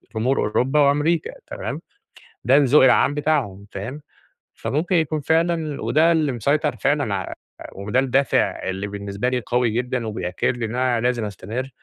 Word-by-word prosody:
جمهور 125 +5 +1
أوروبا 130 +7 +1
وأمريكا 150 +3 +2 0.2
تمام؟ - - -5 0.6
ده 130 +4 +5
الذوق 145 0 +5
العام 130 +2 +4
بتاعهم 140 -10 -1
فاهم؟ 120 +10 -6 0.5
فممكن 170 +6 -1
يكون 155 -2 +1
فعلًا 160 -1 0
وده 160 +3 +3
اللي 155 -4 +2
مسيطر 145 +6 0
فعلًا 145 -8 0
ع 95 -2 -4 0.4
وده 105 +6 -1
الدافع 135 -4 +1
اللي 95 +2 -3
بالنسبة 100 +3 -3
لي 125 -1 -1
أوي 125 -1 +3
جدًا، 120 0 -2
وبيأكد 100 +3 -2
لي 120 - -2
إن 110 +2 -5
أنا 125 -2 +1
لازم 120 -2 0
أستمر. 110 +6 -5
130 Hz, 150 wpm, -22 LUFS, 110-150 Hz, 0.6 s, ده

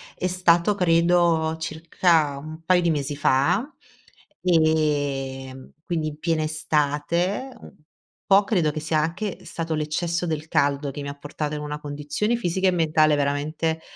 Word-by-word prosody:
è 185 - -2
stato 180 +1 +3
credo 170 -2 +2
circa 160 -2 +1
un 155 +3 -9
paio 185 +1 +4
di 170 -1 +1
mesi 145 -2 -2
fa, 165 - +2 0.7
ehm, 145 -6 0
quindi 165 -3 -2
in 150 -1 -6
piena 165 -2 0
estate 155 - -1
un 195 +2 -4
po' 200 - +2
credo 175 -8 +1
che 155 - -4
sia 155 +1 -1
anche 175 +6 -3
stato 165 -1 -4
l'eccesso 165 +3 -1
del 155 -2 -3
caldo 140 -1 +1
che 140 +2 -6
mi 140 - -5
ha 140 - -8
portato 145 +1 -4
in - - -4
una 150 0 -5
condizione 150 +10 -2
fisica 190 -3 0
e - - +4
mentale 155 -3 +3
veramente, 150 +3 -1
160 Hz, 150 wpm, -24 LUFS, 150-175 Hz, 0.7 s, paio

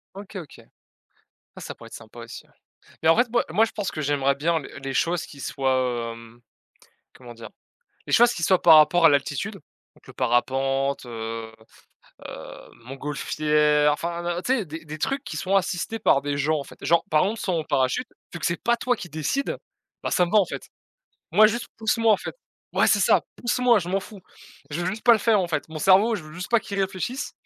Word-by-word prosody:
OK, 200 +1 -11
OK. 170 -6 -9 0.9
Ah - - -10
ça - - -7
pourrait - - -13
être - - -16
sympa - - -12
aussi - - -10
ouais. - - -29 0.5
Mais 160 - +3
en 165 - +6
fait, 240 +1 +3
moi 240 - +2
moi 210 +7 +3
je 225 - -8
pense 205 -3 -3
que 155 - -5
j'aimerais 140 -1 +1
bien 165 +3 0
les 140 - -11
les 135 0 -4
choses 170 +5 0
qui 140 - -14
soient, 130 -4 -1
hem, 115 +1 -14 0.7
comment 120 -2 -12
dire? 115 -2 -11 0.6
Les - - -5
choses 240 0 +6
qui 170 - -5
soient 185 +1 +3
par 160 -2 +8
rapport 160 +3 +5
à - - +9
l'altitude, 145 +8 -1 0.4
donc - - -24
le - - -10
parapente, 135 +2 0
heu 115 -1 -6 0.8
heu, - - -10 0.2
montgolfière, 150 +2 +1
enfin, 170 +2 -3
heu, - - -7
tu - - -1
sais, 215 - -3
des 160 0 -8
des 155 0 -8
trucs 270 - -2
qui 155 - -6
sont 190 +5 0
assistés 195 +3 -1
par 140 - +3
des 145 0 -2
gens 150 +2 +1
en 140 - -5
fait. - - -15
Genre, 170 +2 +2
par 155 0 +3
exemple 215 +4 -2
saut 185 - -2
en 155 - -3
parachute, 135 - 0 0.3
vu 175 - -6
que - - -3
c'est 170 - -1
pas 235 0 +2
toi 245 +1 0
qui 180 - -7
décide, 160 - -2 0.5
bah, - - -2
ça 180 - +3
me 170 - -7
va 215 - +6
en 195 - +3
fait. - - -7 0.6
Moi 215 0 +7
juste 230 +1 -3
pousse 220 +1 0
moi 225 -1 +4
en - - +2
fait. - - -7 0.4
Ouais - - +3
c'est - - +4
ça, - - +4 0.2
pousse 240 +1 -1
moi 245 -3 +5
je 175 - -6
m'en 195 - +1
fous. 200 +1 -12 0.5
Je 155 +4 -3
veux - - -2
juste 205 +4 -4
pas 235 - +8
le 220 - +1
faire 215 -1 +3
en 180 - -1
fait. 165 - -2
Mon 155 - -7
cerveau 195 +7 +5
je 190 - -7
veux 155 0 -12
juste 180 0 -7
pas 235 - +5
qu'il 200 -2 -7
réfléchisse 195 +7 -3
165 Hz, 230 wpm, -24 LUFS, 140-205 Hz, 0.9 s, à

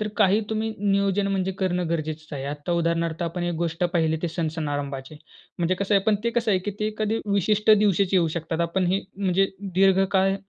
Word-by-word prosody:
तर 215 - -1
काही 205 0 +4
तुम्ही 220 0 -1
नियोजन 200 0 +1
म्हणजे 190 -1 -1
करणं 180 -2 0
गरजेचंच 155 -1 -4
आहे. 135 -2 -4
आता 145 +4 -4
उदाहरणार्थ 170 0 -1
आपण 170 +1 -3
एक 175 0 -1
गोष्ट 165 +1 -2
पाहिली 165 -3 +1
ते 175 - 0
सण-सणारंभाची 145 -4 -3 0.4
म्हणजे 175 +2 +1
कसं 200 +2 0
आहे 195 - +4
पण 215 -1 +3
ते 235 - +2
कसं 235 -1 0
आहे, 190 - +3
की 205 +3 -4
ते 215 - +1
एखादी 215 +1 -1
विशिष्ट 210 +2 +2
दिवशीच 200 -2 +4
येऊ 175 -3 +4
शकतात. 165 +1 -3
आपण 175 +2 0
हे 190 +2 +1 0.2
म्हणजे 195 -1 +1 0.2
दीर्घकाळ 195 0 +3
185 Hz, 195 wpm, -24 LUFS, 165-200 Hz, 0.4 s, काही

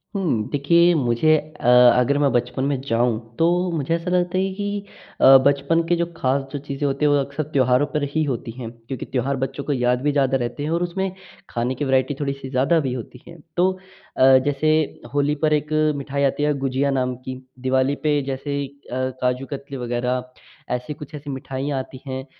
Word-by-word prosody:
हुँ। 150 - 0
देखिए, 170 +5 +4
मुझे 140 +3 +3 0.2
अ, - - -8 0.3
अगर 130 +3 +2
मैं 140 -2 +3
बचपन 125 +1 -1
में 140 -2 0
जाऊँ, 115 -1 +1 0.2
तो 175 +2 +2
मुझे 160 -1 -1
ऐसा 170 +1 -4
लगता 180 0 +1
है 190 +1 0
कि 205 0 -3 0.4
अ, 135 0 +9
बचपन 140 +4 +2
के 175 - +3
जो 170 0 0
खास 135 +2 +1
जो 145 - -2
चीज़ें 140 0 -3
होती 140 +2 0
हैं, 145 - +4
वो 145 - +4
अक्सर 140 +2 -3
त्योहारों 130 +1 +3
पर 150 -2 0
ही 155 - +3
होती 125 -5 -3
हैं, 120 -3 -5
क्योंकि 120 +2 -7
त्योहार 135 +2 -1
बच्चों 135 +2 -4
को 145 - -1
याद 125 -1 +1
भी 145 +2 +1
ज़्यादा 135 -2 +2
रहते 125 +3 -4
हैं 150 - -2
और 170 +1 +1
उसमें 190 +2 -2 0.4
खाने 120 +2 -2
की 145 - -2
वैरायटी 130 +2 +2
थोड़ी-सी 140 -2 -3
ज़्यादा 140 +6 +2
भी 135 -5 -2
होती 125 0 -8
है। 170 - -11 0.2
तो 185 +2 +4 0.5
अ, 130 0 +7
जैसे 145 +2 +2 0.4
होली 145 +1 +1
पर 155 - +3
एक 150 +1 -1 0.2
मिठाई 140 0 -2
आती 140 +1 +1
है 150 0 +2
गुझिया 135 +1 0
नाम 130 -2 0
की, 130 +1 -8 0.2
दिवाली 130 +2 +1
पे 150 -1 +2
जैसे 140 +1 -3
अ, 130 -2 -5
काजू 125 +1 0
कतली 140 0 -7
वगैरह, 125 +1 -1 0.5
ऐसी 125 +4 -5
कुछ 150 +1 -10
ऐसी 145 0 -8
मिठाइयाँ 135 +1 -3
आती 130 0 -8
हैं 130 0 -4
140 Hz, 200 wpm, -22 LUFS, 130-150 Hz, 0.5 s, अ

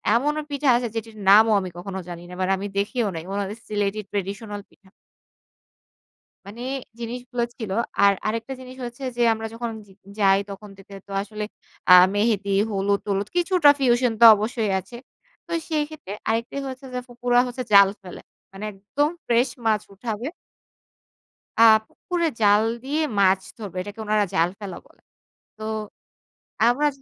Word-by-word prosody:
এমনও 295 +5 +1
পিঠা 285 0 -2
আছে 240 0 0
যেটির 225 -1 -5
নামও 215 +3 +7
আমি 185 -2 -5
কখনো 190 +2 -5
জানি 175 -1 -7
না 180 - -9
মানে 185 +1 +1
আমি 200 +2 -4
দেখিও 215 +3 0
নাই 165 - -5
ওনাদের 200 +1 -3
সিলেটি 205 0 -1
ট্র্যাডিশনাল 205 +1 -4
পিঠা। 190 - -25 1.6
মানে 210 +4 -10 0.4
জিনিসগুলো 245 +1 -4
ছিল। 220 -5 -6 0.3
আর 200 0 +6
আরেকটা 230 +4 -3
জিনিস 255 0 -10
হচ্ছে 240 +3 -8
যে - - 0
আমরা 225 0 -5
যখন 235 0 -4 0.2
য - - -22 0.3
যাই 195 -1 +5
তখন 200 +1 -9
দেখতে 195 0 -13
তো - - -12
আসলে 210 +1 -6 0.5
আ - - +10 0.2
মেহেদি, 205 -1 +1 0.2
হলুদ, 200 0 +1
টলুদ 200 0 -1
কিছুটা 350 -4 +4
ফিউশন 245 -2 +3
তো 235 - +8
অবশ্যই 215 0 -1
আছে। 240 - -12 0.5
তো - - -11 0.2
সেইক্ষেত্রে 300 - -3 0.2
আরেকটা 230 +3 -1
হচ্ছে 260 +1 -9
যে 250 - -2
ফুফুরা 245 0 +1
হচ্ছে 250 +1 -5
জাল 200 -1 +9
ফেলে। 185 -2 -10 0.3
মানে 195 +2 -9
একদম 235 +10 -1 0.2
ফ্রেশ 240 +2 +2 0.2
মাছ 215 -2 +2
উঠাবে। 225 +3 -4 1.3
আ - - +9 0.2
পুকুরে 345 -2 -2
জাল 205 0 +5 0.2
দিয়ে 290 +4 -1 0.2
মাছ 190 -1 +4 0.2
ধরবে। 205 -5 -7
এটাকে 205 +3 -9
উনারা 210 -1 +2
জাল 165 +2 +3
ফেলা 195 -4 -7
বলে। - - -25 0.6
তো 215 - -11 1.1
আমরা 270 +5 +3
215 Hz, 155 wpm, -23 LUFS, 200-245 Hz, 1.6 s, আ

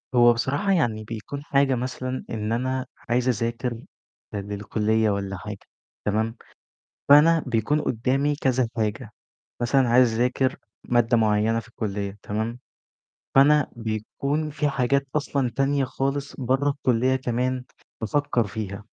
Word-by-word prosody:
هو 120 -1 +7
بصراحة 145 - 0
يعني 115 - +1
بيكون 115 +6 -6
حاجة 140 -3 +2
مثلًا 130 +1 -4
إن 110 -1 -3
أنا 130 +2 -1 0.2
عايز 125 +1 +1
اذاكر 120 +1 -1 0.6
ل - - -2
للكلية 105 +2 0
والَّا 100 -1 -2
حاجة، 105 +1 -7 0.5
تمام، 110 +3 0 0.7
فأنا 155 +3 +7
بيكون 125 +6 +1
قدّامي 135 +5 0
كذا 130 -3 +1
حاجة، 110 +1 -2 0.5
مثلًا 130 +1 +3
عايز 120 0 +5
اذاكر 125 +2 +1 0.3
مادة 120 0 +3
معيّنة 110 +1 +2
في 115 - -15
الكلية 100 -3 -4
تمام، 110 +3 -3 0.8
فأنا 145 +2 +5
بيكون 120 +7 -2
في 150 0 0
حاجات 140 0 +1
أصلًا 140 -3 0
تانية 135 0 +2
خالص 140 +2 -3
برّه 135 +2 +1
الكلية 130 -2 +1
كمان 125 0 -1 0.4
بافكّر 125 -1 +1
فيها. 100 -1 -5
125 Hz, 125 wpm, -24 LUFS, 110-135 Hz, 0.8 s, هو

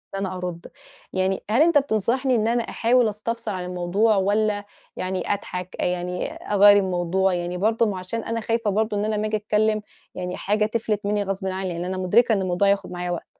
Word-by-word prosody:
إن 195 - -2
أنا 190 -1 -3
أرُد، 180 -2 -5 0.5
يعني 190 0 0
هل 235 +7 +3
أنت 335 -1 +5
بتنصحني 255 0 +1
إن 220 0 +1
أنا 235 0 +1
أحاول 235 +1 +2
أستفسر 230 +2 -4
عن 180 - -4
الموضوع 180 +5 +1
والّا 205 +1 +1 0.3
يعني 185 +1 -2
أضحك 180 -2 -6
آآ، - - +1
يعني 180 0 -2
أغيّر 205 0 +5
الموضوع؟ 185 0 +1
يعني 175 0 -2
برضه 225 +4 +2
ما 195 -3 -2
عشان 215 +5 -4
أنا 230 0 -2
خايفة 230 -1 0
برضه 215 +1 0
إن 205 - 0
أنا 215 0 0
أما 210 +1 -1
آجي 215 0 0
أتكلّم 215 +1 +1 0.3
يعني 180 0 -4
حاجة 210 +2 +1
تِفلت 215 -2 -2
منّي 205 0 +1
غصبٍ 195 0 -3
عنّي، 190 0 -3
يعني 175 +1 -4
أنا 185 0 -3
مدركة 220 +6 +3
إن 195 - +1
الموضوع 185 +1 +1
هياخُد 200 -1 +1
معايا 180 0 -3
وقت. 175 - -4
205 Hz, 205 wpm, -23 LUFS, 185-220 Hz, 0.5 s, أنت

